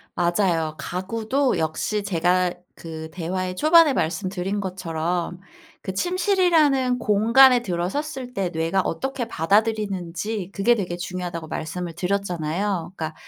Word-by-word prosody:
맞아요. 175 -3 +1
가구도 225 +9 -1
역시 160 +6 -1
제가 180 -1 +1 0.2
그 160 -1 -8
대화의 185 +1 -3
초반에 315 - +6
말씀드린 190 +1 -2
것처럼 175 -1 -3 0.4
그 190 - -4
침실이라는 325 - +2
공간에 235 +4 +5
들어섰을 250 - -3
때 190 -3 -1
뇌가 165 +3 0
어떻게 265 +7 -3
받아들이는지 200 0 -1
그게 220 +5 +3
되게 180 -5 -3
중요하다고 175 -2 -5
말씀을 170 +2 -4
드렸잖아요. 180 -1 -2
그러니까 160 -1 -4
190 Hz, 315 characters per minute, -23 LUFS, 175-230 Hz, 0.4 s, 초반에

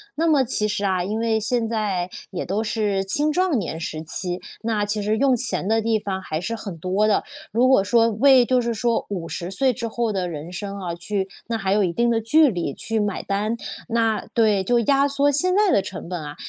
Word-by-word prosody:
那 330 +2 +1
么 290 -4 +4
其 215 -4 -1
实 205 -1 -2
啊， 185 -2 +1
因 210 +4 -2
为 225 -1 +1
现 225 +1 0
在 200 -5 -1 0.2
也 185 - -4
都 205 +5 -1
是 210 -3 0
青 295 +11 +1
壮 360 -5 +1
年 165 -5 -3
时 160 -1 -5
期， 180 +3 -3 0.2
那 215 -2 0
其 205 0 -1
实 215 +2 0
用 270 -1 +3
钱 240 -5 -2
的 225 +1 +2
地 225 0 +1
方 190 -2 -4
还 155 -3 -3
是 230 +7 -3
很 200 -6 -7
多 185 +6 +1
的。 210 - +2 0.3
如 240 +4 +3
果 260 -7 +5
说 230 +3 +3
为 255 +3 +5
就 255 0 +2
是 235 -1 -1
说 230 +1 0
50 175 -2 -4
岁 255 +6 +1
之 230 +1 -4
后 230 0 -1
的 185 -2 -1
人 160 +2 -7
生 200 +1 -5
啊 175 -3 -4
去 190 +2 -3 0.2
那 230 -1 -1
还 195 -2 0
有 210 - +3
一 180 - 0
定 235 +4 +2
的 225 -1 +1
距 300 +5 +4
离 170 - -3
去 225 -1 -3
买 205 -2 -2
单， 210 +4 -1 0.3
那 225 -2 +1
对， 215 -5 +3
就 240 +4 +2
压 275 +4 +3
缩 280 +1 +2
现 365 +6 +3
在 415 -2 +4
的 195 - +4
成 190 -2 -7
本 175 -3 -4
啊， 150 0 -7
215 Hz, 245 characters per minute, -22 LUFS, 190-235 Hz, 0.3 s, 果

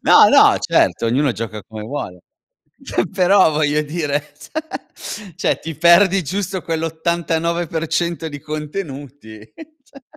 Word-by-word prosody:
no, - - +7
no, - - +6
certo, 115 - +1
ognuno 130 +3 +1
gioca 110 -2 -6
come 110 -1 -9
vuole. 105 -8 -6 0.9
Però, 190 -1 +4
voglio 150 0 +1
dire, 150 -2 -3 0.6
cioè- 200 -5 -8
cioè - - 0
ti 165 -1 -6
perdi 180 +2 +5
giusto 185 +3 -3
quel 165 -1 -3
89% 165 0 -1
di 145 -1 -8
contenuti, 145 - -7 0.4
cioè! 275 -1 -18
160 Hz, 120 wpm, -19 LUFS, 145-175 Hz, 0.9 s, no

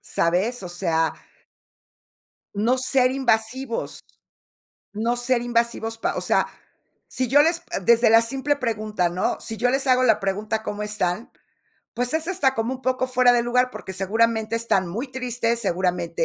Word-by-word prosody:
¿Sabes?, 190 +8 0
o 180 - -6
sea 165 -2 0 1.4
No 230 +6 +1
ser 255 0 +3
invasivos, 245 -1 -1 0.9
no 230 +3 -1
ser 245 0 +1
invasivos, 235 -1 -1
pa - - -1
o - - -1
sea, - - +1 0.6
si 255 -1 -2
yo 290 +4 +6
les 330 +2 +1 0.2
desde 235 +2 +4
la 225 0 +7
simple 270 +4 -1
pregunta, 215 -7 -1
¿no? 180 +2 -1
Si 225 - -6
yo 245 +3 +1
les 270 +1 0
hago 255 0 +4
la 220 -4 +3
pregunta, 210 +3 -2
¿cómo 210 -1 -4
están?, 210 0 -2 0.6
pues, 245 +3 -2
es 320 +1 -1
hasta 285 -9 +1
como 230 +3 -2
un 260 - -11
poco 255 0 0
fuera 250 -1 +4
de 240 -1 +3
lugar, 250 +1 +1
porque 190 - -8
seguramente 220 +3 0
están 200 -5 0
muy 230 +10 -4
tristes, 245 -2 -2
seguramente 180 -3 -1
230 Hz, 160 wpm, -23 LUFS, 210-255 Hz, 1.4 s, la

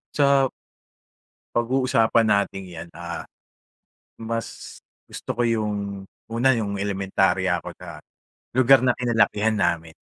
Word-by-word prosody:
Sa 140 -2 +4 1.1
Pag-uusapan 120 -2 +2
nating 100 -2 0
'yan, 85 -1 -9
ah, 85 0 -6 0.9
mas 115 0 -6 0.2
gusto - - -11
ko - - +1
'yong 105 -4 -2 0.2
una, 120 +3 +3
'yong 100 -3 -3
elementarya 95 -2 0
ako - - -8
na - - -10 0.5
lugar 130 +1 +6
na 125 -1 +1
kinalakihan 115 -3 +2
namin. 85 -5 -1
110 Hz, 105 wpm, -23 LUFS, 95-120 Hz, 1.1 s, lugar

